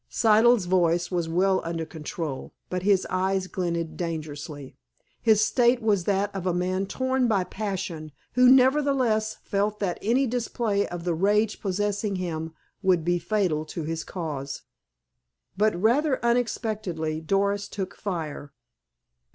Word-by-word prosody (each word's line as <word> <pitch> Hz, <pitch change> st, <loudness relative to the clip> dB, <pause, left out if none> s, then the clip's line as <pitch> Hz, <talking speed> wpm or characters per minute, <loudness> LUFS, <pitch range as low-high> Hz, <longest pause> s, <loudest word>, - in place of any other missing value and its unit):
Siddle's 225 Hz, -1 st, +4 dB
voice 175 Hz, -1 st, +2 dB
was 170 Hz, -2 st, -1 dB
well 185 Hz, +3 st, +2 dB
under 165 Hz, -1 st, -3 dB
control, 155 Hz, -2 st, -6 dB, 0.2 s
but 180 Hz, 0 st, -1 dB
his 195 Hz, 0 st, +3 dB
eyes 190 Hz, +1 st, 0 dB
glinted 170 Hz, -3 st, -3 dB
dangerously. 150 Hz, -4 st, -5 dB, 0.5 s
His 215 Hz, -2 st, +4 dB
state 240 Hz, +1 st, +3 dB
was 205 Hz, -6 st, +1 dB
that 200 Hz, 0 st, 0 dB
of 185 Hz, -1 st, -3 dB
a 175 Hz, -, +1 dB
man 185 Hz, +2 st, -1 dB
torn 260 Hz, +2 st, 0 dB
by 200 Hz, -5 st, +2 dB
passion 185 Hz, -6 st, -4 dB, 0.2 s
who 250 Hz, +1 st, +6 dB
nevertheless 260 Hz, -5 st, +3 dB
felt 205 Hz, +1 st, -1 dB
that 185 Hz, -4 st, -2 dB
any 245 Hz, +6 st, +2 dB
display 230 Hz, -4 st, -1 dB
of 175 Hz, -1 st, -6 dB
the 175 Hz, -1 st, 0 dB
rage 210 Hz, +5 st, +1 dB
possessing 205 Hz, +1 st, -1 dB
him 165 Hz, -3 st, -4 dB, 0.3 s
would 180 Hz, -5 st, +2 dB
be 175 Hz, 0 st, +2 dB
fatal 175 Hz, -4 st, 0 dB
to 160 Hz, +1 st, -5 dB
his 165 Hz, +1 st, -3 dB
cause. 145 Hz, -6 st, -5 dB, 0.9 s
But, 210 Hz, -2 st, +1 dB
rather 260 Hz, -, +3 dB
unexpectedly, 215 Hz, -9 st, -1 dB
Doris 200 Hz, +3 st, 0 dB
took 195 Hz, -2 st, -5 dB
fire. 160 Hz, -7 st, -5 dB
190 Hz, 135 wpm, -26 LUFS, 170-215 Hz, 0.9 s, who